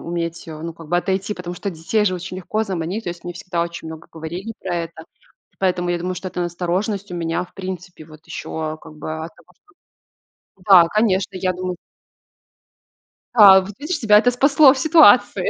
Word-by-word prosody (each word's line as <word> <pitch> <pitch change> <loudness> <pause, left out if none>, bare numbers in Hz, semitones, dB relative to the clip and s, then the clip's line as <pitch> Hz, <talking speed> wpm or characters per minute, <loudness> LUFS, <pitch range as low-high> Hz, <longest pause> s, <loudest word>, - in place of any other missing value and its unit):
уметь, 170 0 -4
э, 155 - -7
ну 165 0 -5
как 165 -1 -13
бы, 175 - +1
отойти. 195 +3 -1
Потому 180 -1 -7
что 200 +2 -4
детей 165 +6 -1
же 185 -3 +1
очень 185 +1 -7
легко 215 +4 -2
заманить. 190 +3 -4
То 175 - -2
есть 170 0 -10
мне 175 - -6
всегда 175 -1 -3
очень 170 -1 -6
много 160 0 -9
говорили 170 +7 -6
про 185 -2 -3
это. 170 -1 -5 0.6
Поэтому 180 -2 0
я 175 - 0
думаю, 180 +2 -3
что 185 - -6
эта 180 - -5
настороженность 180 +3 -2
у - - -4
меня, 165 +1 -2
в - - -21
принципе, 180 -3 -7
вот 155 0 -16
ещё, 160 -1 -5
э, - - -14
как 155 - -13
бы 155 +1 -6
от 165 - -10
того, - - -22
что - - -46 1.0
Да, 180 -4 +8
конечно. 200 -1 0
Я 185 0 0
думаю 180 0 -4 1.6
Да, 195 -3 +9
вот 195 +2 -8
видишь, 305 +2 -3
тебя 210 -3 +6
это 245 - +3
спасло 275 +2 +5
в - - -6
ситуации. 315 +5 +5
180 Hz, 200 wpm, -20 LUFS, 170-200 Hz, 1.6 s, Да